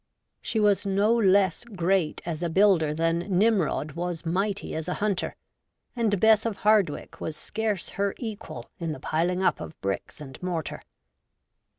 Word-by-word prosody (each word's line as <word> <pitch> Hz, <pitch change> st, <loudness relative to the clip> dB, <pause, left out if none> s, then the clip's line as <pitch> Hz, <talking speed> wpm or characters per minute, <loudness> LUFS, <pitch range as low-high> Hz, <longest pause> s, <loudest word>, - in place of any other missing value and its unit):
She 225 Hz, -, -1 dB
was 205 Hz, -2 st, +3 dB
no 200 Hz, +3 st, +2 dB
less 195 Hz, -5 st, +3 dB
great 190 Hz, -6 st, 0 dB
as 165 Hz, -2 st, -4 dB
a 170 Hz, -, 0 dB
builder 180 Hz, -4 st, +4 dB
than 165 Hz, +2 st, +1 dB
Nimrod 185 Hz, -5 st, +1 dB
was 175 Hz, +1 st, -4 dB
mighty 195 Hz, +4 st, -1 dB
as 160 Hz, 0 st, -4 dB
a 180 Hz, -, -1 dB
hunter, 200 Hz, -3 st, -1 dB, 0.6 s
and 220 Hz, -5 st, +1 dB
Bess 220 Hz, 0 st, +5 dB
of 225 Hz, -3 st, -2 dB
Hardwicke 205 Hz, -8 st, +2 dB
was 155 Hz, -1 st, -4 dB
scarce 215 Hz, 0 st, -2 dB
her 200 Hz, 0 st, -1 dB
equal 220 Hz, -3 st, -7 dB
in 165 Hz, -2 st, -2 dB
the -, -, -8 dB
piling 180 Hz, +4 st, 0 dB
up -, -, +2 dB
of 160 Hz, -, -8 dB
bricks 100 Hz, +8 st, -4 dB
and 135 Hz, -3 st, -10 dB
mortar. 175 Hz, -4 st, -3 dB
185 Hz, 160 wpm, -26 LUFS, 165-210 Hz, 0.6 s, Bess